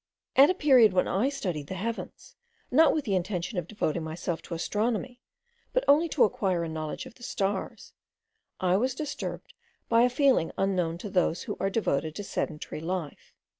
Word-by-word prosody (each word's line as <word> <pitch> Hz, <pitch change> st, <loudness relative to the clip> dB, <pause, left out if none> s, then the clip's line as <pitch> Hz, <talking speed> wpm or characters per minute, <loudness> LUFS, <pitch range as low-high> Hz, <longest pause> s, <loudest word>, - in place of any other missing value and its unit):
At 275 Hz, +2 st, +8 dB
a 370 Hz, -, +2 dB
period 255 Hz, -, +5 dB
when 185 Hz, -, +2 dB
I 215 Hz, +9 st, +1 dB
studied 180 Hz, -, -4 dB
the 190 Hz, -, -5 dB
heavens, 230 Hz, +5 st, -6 dB, 0.4 s
not 315 Hz, +5 st, +6 dB
with 305 Hz, -3 st, -1 dB
the 205 Hz, -, -1 dB
intention 180 Hz, +1 st, -1 dB
of 170 Hz, -, -6 dB
devoting 170 Hz, -6 st, -2 dB
myself 165 Hz, +1 st, -4 dB
to 170 Hz, -, -6 dB
astronomy, 225 Hz, +7 st, -2 dB, 0.5 s
but -, -, +2 dB
only 310 Hz, +4 st, +5 dB
to 295 Hz, -, +3 dB
acquire 185 Hz, -4 st, +1 dB
a 165 Hz, -, -3 dB
knowledge 155 Hz, +7 st, -5 dB
of 255 Hz, -, -11 dB
the 240 Hz, -, -22 dB
stars, 200 Hz, -5 st, -3 dB, 0.7 s
I 185 Hz, 0 st, +2 dB
was 255 Hz, +4 st, 0 dB
disturbed 300 Hz, 0 st, -5 dB, 0.4 s
by 230 Hz, 0 st, +5 dB
a 250 Hz, -, +5 dB
feeling 260 Hz, -, +2 dB
unknown 180 Hz, -4 st, 0 dB
to -, -, -3 dB
those 180 Hz, -2 st, +1 dB
who -, -, -4 dB
are 195 Hz, -, +1 dB
devoted 160 Hz, -7 st, -1 dB
to 205 Hz, -, -5 dB
sedentary 155 Hz, -5 st, -4 dB
life. 170 Hz, -2 st, -5 dB
195 Hz, 180 wpm, -28 LUFS, 170-250 Hz, 0.7 s, At